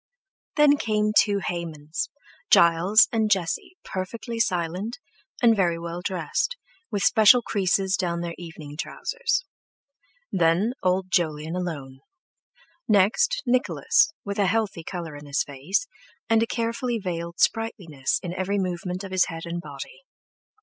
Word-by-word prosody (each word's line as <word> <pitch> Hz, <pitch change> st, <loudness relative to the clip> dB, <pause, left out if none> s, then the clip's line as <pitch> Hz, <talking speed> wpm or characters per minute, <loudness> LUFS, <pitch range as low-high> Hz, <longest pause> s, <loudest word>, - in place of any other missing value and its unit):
Then 295 Hz, -1 st, +5 dB
came 215 Hz, -3 st, +1 dB
two 205 Hz, -2 st, +4 dB
Haymans—Giles 170 Hz, -, +2 dB
and 220 Hz, -2 st, +1 dB
Jesse 205 Hz, -, -1 dB
perfectly 230 Hz, +5 st, -5 dB
silent, 185 Hz, +2 st, -1 dB, 0.5 s
and 230 Hz, -1 st, +6 dB
very 175 Hz, -4 st, +1 dB
well 170 Hz, +1 st, -5 dB
dressed, 185 Hz, -, -2 dB, 0.3 s
with 200 Hz, -2 st, -2 dB
special 220 Hz, +3 st, +6 dB
creases 190 Hz, -2 st, +1 dB
down 170 Hz, -2 st, -1 dB
their 170 Hz, -1 st, -4 dB
evening 160 Hz, -4 st, -10 dB
trousers. -, -, -2 dB, 0.9 s
Then 180 Hz, +6 st, +2 dB
old 185 Hz, 0 st, 0 dB
Jolyon 160 Hz, -2 st, 0 dB
alone. 145 Hz, -7 st, -5 dB, 0.9 s
Next, 230 Hz, -, +3 dB
Nicholas, 255 Hz, +5 st, +3 dB
with 200 Hz, 0 st, -4 dB
a 200 Hz, -, +3 dB
healthy 205 Hz, -4 st, -1 dB
colour 170 Hz, -4 st, -6 dB
in 145 Hz, 0 st, -10 dB
his 140 Hz, +1 st, +1 dB
face, 145 Hz, -, -2 dB, 0.4 s
and 225 Hz, 0 st, +3 dB
a 230 Hz, -, +1 dB
carefully 235 Hz, +1 st, -1 dB
veiled 170 Hz, -3 st, -5 dB
sprightliness 180 Hz, -, 0 dB
in 175 Hz, -1 st, -4 dB
every 190 Hz, +2 st, -1 dB
movement 180 Hz, 0 st, -3 dB
of 195 Hz, -, -7 dB
his 185 Hz, -1 st, +3 dB
head 165 Hz, 0 st, -7 dB
and 170 Hz, 0 st, -4 dB
body. -, -, -9 dB
185 Hz, 130 wpm, -25 LUFS, 170-225 Hz, 0.9 s, and